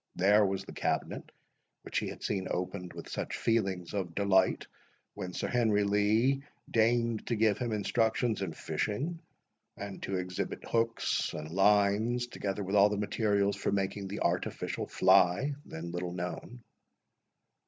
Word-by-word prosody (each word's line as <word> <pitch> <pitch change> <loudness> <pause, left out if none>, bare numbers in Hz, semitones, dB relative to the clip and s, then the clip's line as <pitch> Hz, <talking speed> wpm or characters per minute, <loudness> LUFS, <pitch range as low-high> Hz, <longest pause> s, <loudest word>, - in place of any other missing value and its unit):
There 105 +3 +5
was 95 -1 0
the - - -9
cabinet, - - -2 0.5
which - - -1
he - - -3
had - - -8
seen 95 -2 -1
opened 90 0 -3
with - - -8
such - - -4
feelings 95 -6 0
of 90 -5 -3
delight 95 -2 +3 0.5
when 95 -3 -5
Sir - - -3
Henry 110 -4 +2
Lee 110 +7 +2 0.3
deigned 115 0 +2
to 120 - +1
give 110 -1 +2
him 120 -2 -2
instructions 110 +1 +1
in 95 -4 -2
fishing, 110 - -2 0.6
and 100 -1 -7
to 95 - -3
exhibit 90 0 -4
hooks 115 0 0
and 75 +1 -6
lines, 105 +5 +3
together 105 -4 -4
with 95 +2 -2
all 100 +1 +7
the 105 - -2
materials 100 -1 +1
for - - -1
making 100 0 -1
the 100 +2 -5
artificial - - -1
fly, 95 +9 +4
then 85 +1 -6
little 90 0 -3
known. 90 +7 -6
100 Hz, 150 wpm, -31 LUFS, 95-110 Hz, 0.6 s, all